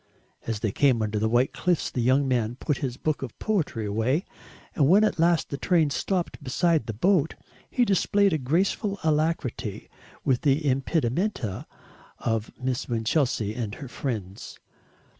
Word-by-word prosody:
As 110 -2 -2
they 110 - 0
came 125 -1 +3
under 105 0 -1
the 110 +1 +1
white 120 +3 +2
cliffs 180 -3 0
the 125 - -1
young 130 +4 +3
man 120 -2 0
put 145 +2 -2
his 130 -3 -3
book 155 0 -1
of 130 -4 -6
poetry 165 - -1
away, 115 - 0 0.5
and 140 -2 +3
when 200 +5 +6
at 205 -5 +1
last 170 0 +3
the 140 - -3
train 165 -5 +2
stopped 180 +3 -2
beside 155 0 +1
the 115 - -3
boat, 170 - +2 0.3
he 245 - +2
displayed 200 -1 +3
a 155 - +1
graceful 190 +8 0
alacrity 155 -9 -1 0.3
with 130 -2 +2
the 145 +1 +2
impedimenta 135 - -1 0.5
of 115 -2 -2
Miss 130 -1 -2
Winchelsea 115 -2 0
and 110 -3 -4
her 140 - -8
friends. 110 -7 -5
135 Hz, 160 wpm, -26 LUFS, 115-165 Hz, 0.5 s, when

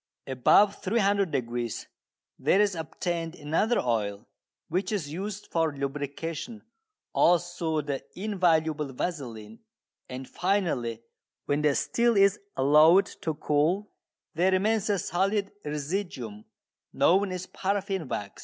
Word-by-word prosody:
Above 195 +10 +4
300° 185 - 0 0.5
there 195 - +3
is 205 -2 +3
obtained 165 0 -3
another 165 +10 +1
oil, 105 -3 -1 0.4
which 185 +2 -1
is 160 -9 -3
used 200 +3 -5
for 160 -3 0
lubrication, 150 - -4 0.5
also 175 -2 +2
the 140 -2 -4
invaluable 160 -7 +1
vaseline, 120 -9 -5 0.5
and 130 0 -6
finally, 155 - -1 0.4
when 145 +1 0
the 150 -2 +3
still 235 -2 +2
is 200 +1 +4 0.2
allowed 155 +7 +6
to 160 -2 -5
cool, 160 +8 0 0.4
there 180 +3 +2
remains 210 +3 +1
a 205 - +2
solid 195 +3 0
residuum 150 - -4 0.5
known 195 +2 +3
as 185 0 -4
paraffin 195 -4 -2
wax. 100 -5 -5
165 Hz, 110 wpm, -27 LUFS, 140-195 Hz, 0.5 s, allowed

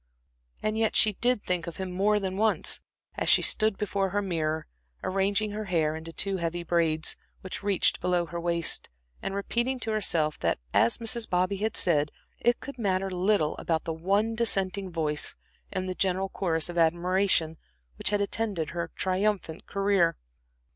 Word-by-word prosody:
And 215 +1 0
yet 220 -1 +1
she 215 - +5
did 240 +1 +1
think 180 -2 -2
of 170 - -6
him 190 -1 -4
more 205 +3 +2
than 190 -2 -3
once, 215 +2 +2 0.3
as - - -1
she - - +6
stood 215 -2 +3
before 195 -2 -1
her 205 +2 0
mirror, 160 -4 -1 0.4
arranging 200 +2 0
her 215 +1 -4
hair 160 -5 +1
into 160 +1 -7
two 195 +3 0
heavy 170 0 -2
braids, 165 -2 +1 0.3
which 185 - -6
reached 200 -2 +2
below 180 -1 +1
her 170 +1 -5
waist, 170 -1 +1 0.3
and 195 - -3
repeating 235 +6 -1
to 225 - -2
herself 165 -8 +1
that, - - +1 0.2
as 115 - +3
Mrs. 230 0 -2
Bobby 185 +2 +1
had 215 +2 -1
said, 150 -4 +2 0.3
it 240 0 +2
could 280 -3 -9
matter 195 -2 0
little 180 -3 +1
about 160 -1 -1
the 165 - -3
one 200 +7 +1
dissenting 200 -4 +1
voice 155 -3 -1 0.4
in 185 0 -2
the 185 - -2
general 190 +1 0
chorus 165 -5 -1
of 175 -1 -2
admiration 170 0 +2 0.4
which - - +2
had 205 0 +1
attended 200 -6 -2
her 170 -1 -3
triumphant 190 -3 -1
career. 195 -4 +2
185 Hz, 170 wpm, -28 LUFS, 170-205 Hz, 0.4 s, she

